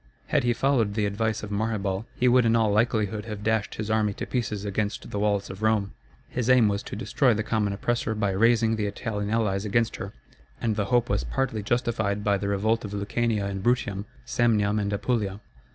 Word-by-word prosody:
Had - - +2
he 120 - +2
followed 120 -5 +1
the 105 -2 +1
advice 110 +2 -1
of 105 - -6
Maherbal, 105 -1 -1
he 125 - +2
would 125 0 +5
in 115 0 +3
all 110 -2 +3
likelihood 105 -1 +1
have 105 -2 -6
dashed 110 -1 0
his 110 0 -3
army 110 -2 +2
to - - -5
pieces 105 -5 -2
against 105 +1 -3
the 100 - -2
walls 100 -1 0
of 95 +2 -10
Rome. 110 -2 +1 0.4
His 125 -1 -2
aim 125 -4 +6
was 100 0 -1
to - - -7
destroy 120 +3 +2
the 110 - -1
common 110 -2 0
oppressor 110 +2 -1
by 105 -2 0
raising 115 +2 +3
the 105 -1 0
Italian 105 0 -3
allies 105 -3 0
against 115 +2 0
her; 95 - -6 0.5
and 115 -3 0
the 105 -2 0
hope 120 +3 +2
was - - 0
partly 110 - -1
justified 110 -2 0
by 100 -1 +2
the 100 - -2
revolt 110 +3 +1
of 105 -1 -6
Lucania 105 +1 0
and 100 -1 -3
Bruttium, 105 -3 0 0.2
Samnium 110 -3 +2
and 100 0 -2
Apulia. 100 -2 -1
105 Hz, 205 wpm, -26 LUFS, 100-115 Hz, 0.5 s, aim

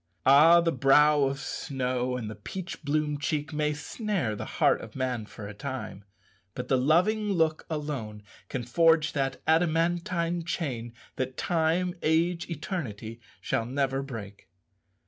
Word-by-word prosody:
Ah! 155 +6 +7
the 165 0 +1
brow 150 0 +5
of 135 0 -2
snow 130 -3 -2
and 115 -3 -5
the 110 - -5
peach 180 - -7
bloom 150 0 0
cheek 150 +1 -2
may 150 0 +1
snare 150 - -2
the - - -5
heart - - +3
of 115 - -11
man 125 -5 -2
for 105 -1 -9
a 105 - -7
time, 100 0 -6 0.5
but 125 - -5
the 135 - +4
loving 185 +11 +2
look 160 -4 +1
alone 140 -10 -4 0.3
can 125 - -3
forge 160 +5 +3
that 135 -2 -2
adamantine 170 +1 +1
chain 135 -9 -3 0.3
that 130 0 -3
time, 175 +1 +1
age, 165 +3 +1
eternity 120 - -5 0.2
shall 115 - -1
never 135 +1 0
break. 105 -9 -8
150 Hz, 145 wpm, -28 LUFS, 125-165 Hz, 0.5 s, Ah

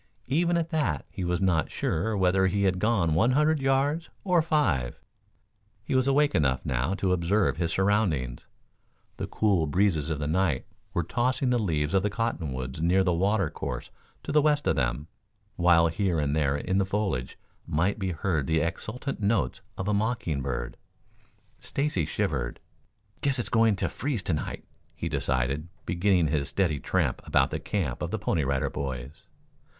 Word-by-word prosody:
Even 170 +5 +2
at 165 0 -2
that 155 -2 0
he 95 -1 -5
was 90 0 0
not 90 -4 +1
sure 105 +7 -1
whether 95 0 +3
he 100 +2 0
had 95 -1 +2
gone 100 -7 +2
one 110 +10 +3
hundred 150 +2 +3
yards 140 +5 +1
or 180 -3 +3
five. 95 - 0 0.9
He - - -2
was 130 0 +3
awake 145 +1 +3
enough, 65 -4 +1
now, 65 +8 0
to 95 -2 +1
observe 90 +3 +1
his 85 -1 -1
surroundings. 95 - 0 0.7
The - - -3
cool 95 -7 +1
breezes 80 -2 +1
of 80 - -1
the 75 - -3
night 80 -3 +1 0.3
were 85 - +1
tossing 125 - 0
the 120 - +2
leaves 80 -7 0
of 95 - +4
the 105 - 0
cottonwoods 75 - -3
near 90 +3 +3
the 90 -2 +2
water 95 0 +1
course - - -5 0.3
to - - -4
the 150 - +5
west 150 -1 +2
of - - +2
them, 65 +2 -1 0.5
while 85 -1 +5
here 85 +1 0
and 75 -1 0
there 75 -2 +1
in 95 +6 0
the - - +3
foliage 95 -12 -2 0.3
might 90 +8 0
be 95 -2 -1
heard 80 -4 -1
the 80 0 +2
exultant 105 - -3
notes 105 +2 0 0.2
of 95 - -3
a 105 - +2
mocking 100 - -1
bird. - - -4 0.8
Stacy 140 - -1
shivered. - - -2 0.6
"Guess 140 -1 +1
it's 120 - -2
going 115 -3 +4
to 95 - -1
freeze 125 -6 -3
to 90 - 0
night," 75 - -4 0.3
he 85 - -4
decided, 70 0 -1 0.2
beginning 90 -2 +2
his 70 -2 0
steady 85 -7 0
tramp - - 0
about - - +2
the - - -2
camp 85 -12 -2
of - - -2
the - - -2
Pony 80 - 0
Rider 65 0 0
Boys. 65 +2 -6
95 Hz, 175 wpm, -27 LUFS, 75-110 Hz, 0.9 s, the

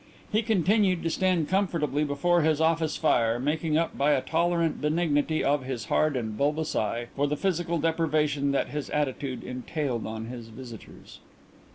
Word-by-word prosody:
He 215 - +2
continued 200 -3 +2
to 165 - 0
stand 180 -3 +1
comfortably 165 -7 0
before 160 +4 +2
his 155 -1 +2
office 160 -1 +1
fire, 115 -7 +2
making 155 +3 0
up 165 0 -1
by 145 +2 +3
a 130 - +2
tolerant 170 +1 0
benignity 155 0 +1
of 145 -1 +1
his 130 -4 -4
hard 155 -2 +2
and 110 -4 -3
bulbous 150 +5 0
eye 115 +3 -1
for 145 +1 +1
the 150 +1 -1
physical 175 -2 0
deprivation 150 -3 +1
that 140 - 0
his 150 -1 -4
attitude 140 -3 -2
entailed 125 -1 -3
on 110 0 -5
his 120 -1 -8
visitors. 115 -1 -11
150 Hz, 165 wpm, -27 LUFS, 130-165 Hz, -, by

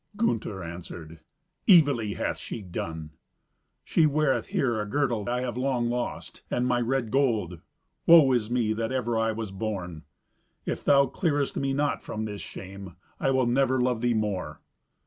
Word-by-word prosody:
Gunther 115 - -1
answered, 85 -1 -8 0.5
"Evilly 140 - +5
hath - - -2
she 110 - -6
done." 80 -3 -5 0.7
"She 160 - +3
weareth 150 -2 +1
here 120 -5 0
a - - -3
girdle 120 -5 0
I 125 +1 0
have 125 -2 -3
long 125 -2 0
lost, 120 0 -4
and 125 - 0
my 125 -1 +1
red 120 -2 -1
gold. 110 - +1 0.5
Woe 160 -5 +8
is 120 -4 +1
me 120 -3 +1
that 115 +1 -2
ever 120 -3 -1
I 115 0 +1
was 110 -2 -5
born! 95 -5 -4 0.6
If - - -3
thou 140 -1 +5
clearest 145 -3 -1
me 135 0 -1
not 145 +2 0
from 110 0 -4
this 105 -1 -6
shame, 95 -2 -9 0.2
I - - +1
will 130 -1 +2
never 130 +2 +2
love 125 -2 +1
thee 120 -1 +2
more." 95 -8 -2
120 Hz, 165 wpm, -27 LUFS, 105-135 Hz, 0.7 s, Woe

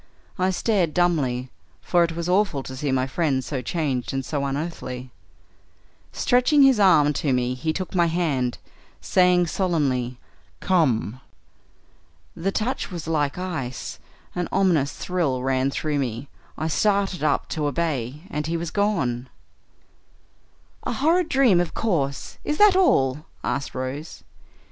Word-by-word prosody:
I 185 +1 +2
stared 190 -4 0
dumbly, 135 -8 +1 0.3
for 175 -1 +2
it 165 -1 -1
was 170 0 -3
awful 180 -7 +1
to 130 - -7
see 140 +1 -2
my 130 -1 +1
friend 135 -2 0
so 135 -4 -3
changed 135 -2 -2
and 135 -1 -2
so 145 -2 -2
unearthly. 135 -3 -4 1.0
Stretching 250 +4 +3
his 265 -5 +5
arm 155 -7 +5
to 145 -1 -1
me 125 0 +1
he 160 +5 -2
took 185 +3 -4
my 175 -2 +3
hand, 150 -8 0 0.4
saying 180 -1 +3
solemnly, 140 -9 0 0.4
'Come!' 130 - +1 1.2
The 190 +4 -1
touch 225 +6 -2
was 170 -4 -6
like 150 -2 0
ice; 160 -9 -5 0.3
an 180 -1 -2
ominous 175 -8 +2
thrill 155 -9 -1
ran 130 0 +1
through 145 +1 -1
me; 125 +1 -3 0.3
I 155 - -2
started 195 +1 +1
up 150 -2 +1
to 150 -2 -1
obey, 145 -2 -2
and 150 +1 -2
he 170 +1 -1
was 165 -1 -4
gone." 130 - 0 1.5
"A - - -3
horrid 330 +4 +2
dream, 255 -9 +4
of 175 - -4
course. 145 -11 -2
Is 300 - -1
that 415 -2 +6
all?" 150 - +2 0.2
asked 140 - -2
Rose. 130 - -5
155 Hz, 140 wpm, -24 LUFS, 130-180 Hz, 1.5 s, that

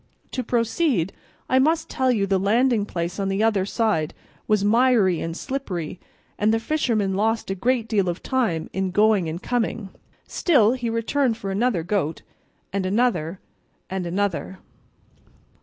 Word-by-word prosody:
To 255 - -2
proceed, 230 - 0 0.3
I 260 - +3
must 320 +4 +2
tell 260 -1 +1
you 210 -5 +1
the 195 -1 +1
landing 220 +2 +2
place 175 +1 -3
on 195 -1 0
the 195 +2 0
other 205 -4 +2
side 205 -10 0 0.3
was 210 -2 +2
miry 225 -5 +3
and 165 +1 -4
slippery, 185 - -4 0.4
and 210 +1 +3
the 225 - +2
fisherman 225 -7 0
lost 220 +1 0
a - - +1
great 235 +4 0
deal 200 -5 +1
of 175 - -5
time 225 -12 0
in 190 0 -1
going 205 -3 +3
and 165 +2 -4
coming; 230 -4 -1 0.4
still 250 - +3
he 245 -3 -3
returned 230 +2 0
for 195 -4 -4
another 205 -3 +1
goat, 175 -4 -1 0.5
and 200 -1 0
another, 190 -5 0 0.5
and 190 -2 -2
another." 185 -1 -2
210 Hz, 155 wpm, -23 LUFS, 190-240 Hz, 0.5 s, I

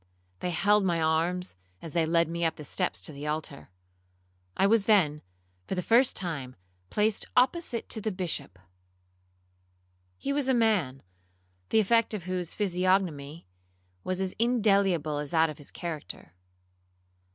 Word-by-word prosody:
They 180 - -2
held 200 +5 +3
my 175 -3 +1
arms 165 +3 0 0.2
as 165 - -8
they 165 -1 +1
led 170 0 +3
me 170 +1 -3
up 165 - +1
the 150 - -9
steps 180 +6 -1
to - - -4
the 145 +2 -6
altar. 150 - -4 0.9
I - - +4
was 210 0 +3
then, 165 -9 +3 0.5
for - - -2
the 180 - -2
first 245 +6 +4
time, 145 -8 -4 0.3
placed 210 0 +1
opposite 255 -1 +1
to 220 - +1
the 215 - -1
Bishop. 170 - -4 1.6
He 280 - -2
was 285 -2 0
a 265 - +3
man, 195 - +1 0.7
the - - +4
effect 230 +1 +3
of 195 - -6
whose 180 -1 -3
physiognomy 180 -6 0 0.6
was 185 0 -2
as 190 -1 -2
indelible 200 -10 +2
as 145 -1 -4
that 160 0 +3
of 150 - -12
his 145 - -8
character. 150 - -7
180 Hz, 150 wpm, -28 LUFS, 160-210 Hz, 1.6 s, I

